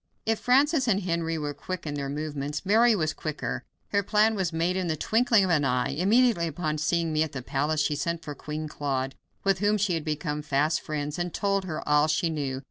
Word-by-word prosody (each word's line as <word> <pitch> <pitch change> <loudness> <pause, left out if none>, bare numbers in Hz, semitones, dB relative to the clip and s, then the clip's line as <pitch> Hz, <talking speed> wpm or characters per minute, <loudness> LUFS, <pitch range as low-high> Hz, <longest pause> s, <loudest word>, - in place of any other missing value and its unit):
If 225 -1 +1
Francis 270 +2 +3
and 200 -3 +2
Henry 170 -2 -1
were 150 -1 -3
quick 175 +5 -6
in 150 - -3
their 140 -1 -3
movements, 145 +1 -4
Mary 225 +3 +5
was 155 -5 0
quicker. 155 -2 -4 0.2
Her 200 - +2
plan 210 +2 +3
was 190 -5 -1
made 170 +3 0
in 185 -2 -1
the 160 -1 -1
twinkling 225 +3 +3
of 185 - +1
an 150 -3 +3
eye. 125 -2 +1
Immediately 195 - +3
upon 155 -1 -2
seeing 165 +1 0
me 155 - +2
at 160 -1 -1
the 130 -3 -5
palace 150 +4 0
she 150 - 0
sent 170 +2 -2
for 150 - -5
Queen 155 +2 -5
Claude, 135 -3 -2 0.3
with 195 -2 +2
whom 205 +1 +2
she 200 -2 +1
had 165 -2 -1
become 150 -1 -2
fast 150 +2 +1
friends, 150 +1 -4
and 175 -1 -3
told 200 -1 0
her 155 -4 -5
all 150 +1 +4
she 165 +2 +1
knew. 140 -4 -2
160 Hz, 220 wpm, -27 LUFS, 150-195 Hz, 0.3 s, Mary